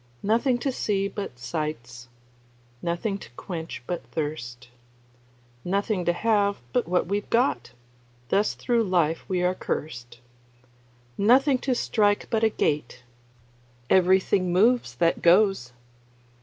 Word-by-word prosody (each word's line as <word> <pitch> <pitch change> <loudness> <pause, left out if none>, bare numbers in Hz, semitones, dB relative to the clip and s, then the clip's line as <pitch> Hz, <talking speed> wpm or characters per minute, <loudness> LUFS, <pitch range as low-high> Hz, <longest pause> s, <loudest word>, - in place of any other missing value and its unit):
Nothing 235 +4 +2
to 265 +3 -2
see 200 -5 -1
but 200 -10 -6
sights, 125 -4 -5 0.7
Nothing 175 +4 -2
to - - -12
quench 165 -8 -6
but 175 - -4
thirst, 125 -7 -5 0.9
Nothing 195 0 -1
to 175 - +2
have 205 +1 +1 0.2
but 250 -2 +1
what 180 +1 +1
we've 200 +3 -3
got; 140 - 0 0.6
Thus 205 +2 +1
thro' 240 -2 0
life 175 -6 +1
we 180 -2 0
are 180 +1 +2
cursed. 125 -9 -5 1.0
Nothing 255 +6 +4
to 260 -1 -1
strike 205 -3 +1
but 225 -1 +1
a 225 - +5
gait; 145 - -2 0.9
Everything 185 0 +3
moves 210 - +2
that 165 +6 +1
goes. 185 - +3
185 Hz, 120 wpm, -25 LUFS, 155-215 Hz, 1.0 s, a